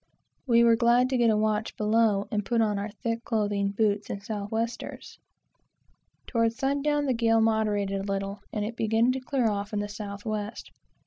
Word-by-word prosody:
We 235 -1 +5
were 230 -1 +6
glad 240 +2 +3
to 260 - +2
get 235 -1 +4
a 215 - +3
watch 215 0 -1
below, 210 -1 +2
and 210 -1 0
put 235 +3 0
on 210 -2 +1
our 205 +2 -3
thick 230 +2 -4
clothing, 205 -3 0
boots, 205 0 0
and 200 - -5
south 205 -1 -4
westers. 230 +2 -4 1.1
Towards 230 -2 +1
sun 275 +3 0
down 295 0 +1
the 265 - +1
gale 225 -1 +3
moderated 210 -3 +1
a 200 0 -4
little, 195 +1 -3
and 210 -1 -2
it 230 +2 -5
began 225 +2 +2
to 260 - -2
clear 255 -2 0
off 205 0 -2
in 210 - 0
the 205 - -2
south 205 0 -7
west. 215 0 -4
220 Hz, 195 wpm, -27 LUFS, 205-230 Hz, 1.1 s, were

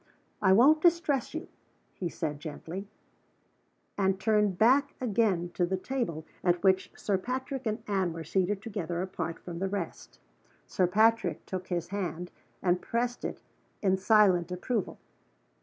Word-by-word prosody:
"I 190 - +5
won't 275 +10 +6
distress 320 -6 +2
you," 320 - -4 0.5
he 175 - -3
said, 150 -3 -4
gently 165 +6 -7 1.1
and 190 -1 +2
turned 210 -2 +2
back 270 +7 +4
again 205 -7 +1
to 180 - 0
the 185 +2 0
table 185 - -3 0.2
at 175 -1 +2
which 190 -1 +3
Sir 195 -2 0
Patrick 260 +3 -3
and 215 +2 -2
Anne 190 -4 0
were 165 0 -6
seated 190 +4 0
together 180 -6 -3
apart 170 -3 -4
from 170 -1 -8
the 195 +1 -1
rest. 195 -3 -5 0.5
Sir 185 -3 +1
Patrick 220 +5 +2
took 185 -1 -5
his 175 -2 -2
hand, 180 -3 -4 0.3
and 180 -1 +2
pressed 245 +1 -2
it - - -4 0.4
in 190 -1 +4
silent 190 -3 +4
approval. 200 +7 -2
190 Hz, 145 wpm, -29 LUFS, 175-225 Hz, 1.1 s, won't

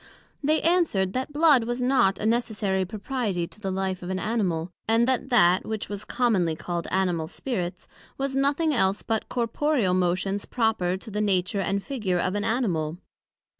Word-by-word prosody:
They 310 +2 +2
answered, 320 - +2
That 260 +3 -2
blood 290 -5 +5
was 240 +1 -2
not 250 -6 +3
a - - -4
necessary 215 -4 0
propriety 205 -2 -2
to 170 +4 -14
the 195 -2 -3
life 190 -1 -2
of 180 - -6
an 190 - -1
Animal; 185 -6 -1 0.2
and 225 +2 +3
that 260 0 0
that 185 -7 +4
which 220 -1 -4
was 205 0 -6
commonly 200 -10 +1
called 170 +1 -4
Animal 180 -4 0
spirits, 180 -3 -4 0.3
was 270 0 -2
nothing 285 +3 +2
else 195 -5 +1
but 225 -1 -2
corporeal 240 -3 +1
motions 185 +2 0
proper 220 -7 0
to 220 +3 -11
the 210 +1 -1
nature 195 -1 +1
and 195 +1 -1
figure 215 -10 -1
of 185 +2 0
an 205 0 -1
Animal. 180 -9 -1
205 Hz, 170 wpm, -26 LUFS, 185-245 Hz, 0.3 s, blood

